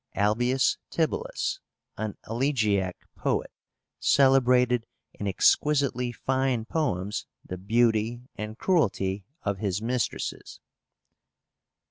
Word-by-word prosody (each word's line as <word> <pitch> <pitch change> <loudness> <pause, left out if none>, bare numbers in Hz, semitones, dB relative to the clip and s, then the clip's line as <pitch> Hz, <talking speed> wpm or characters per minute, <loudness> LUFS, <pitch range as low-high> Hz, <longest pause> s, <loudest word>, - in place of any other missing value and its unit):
ALBIUS 120 +6 +2
TIBULLUS, 160 -2 -1 0.4
an 110 -1 -4
elegiac 110 -7 +1 0.2
poet, - - -1 0.5
celebrated 125 -3 +4 0.3
in 100 - -5
exquisitely 125 +3 +2
fine 130 -1 0
poems 105 - -2 0.2
the 90 - -5
beauty 115 +3 +1
and 105 +1 -6
cruelty 100 - +1 0.2
of 100 -2 -1
his 100 -2 -1
mistresses. 120 0 -3
115 Hz, 85 wpm, -27 LUFS, 105-130 Hz, 0.5 s, celebrated